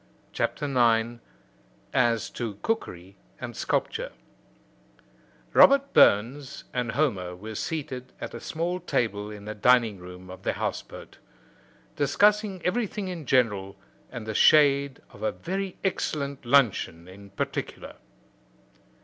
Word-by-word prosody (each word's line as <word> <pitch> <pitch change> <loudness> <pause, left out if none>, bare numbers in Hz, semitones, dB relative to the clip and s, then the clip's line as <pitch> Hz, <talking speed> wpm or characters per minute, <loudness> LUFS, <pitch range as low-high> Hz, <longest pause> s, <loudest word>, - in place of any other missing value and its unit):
CHAPTER 150 - -1
IX: 120 -3 +2 0.7
AS 120 -3 +2
TO 115 -4 -4
COOKERY 95 - -3 0.2
AND 120 -1 -6
SCULPTURE - - -1 1.4
Robert 275 0 +6
Burns 125 +7 +3
and 125 -2 -2
Homer 95 -12 0
were 110 +4 -8
seated 130 0 -4
at - - -6
a - - -6
small 170 +3 -3
table 105 - -1
in 105 -1 -9
the 105 - -4
dining 115 -2 +3
room 90 +1 -11
of 95 0 -10
the - - -1
house - - -2
boat, - - -13 0.8
discussing 200 +6 +2
everything 205 -1 -1
in 165 -6 -6
general 105 -7 +1 0.4
and 115 -3 -7
the 110 - -4
shade 140 +2 +4
of - - -15
a 270 - 0
very 190 -1 -4
excellent 140 -8 -2
luncheon 110 -10 +2
in 100 +2 -13
particular. 100 - -5
125 Hz, 125 wpm, -26 LUFS, 105-160 Hz, 1.4 s, Robert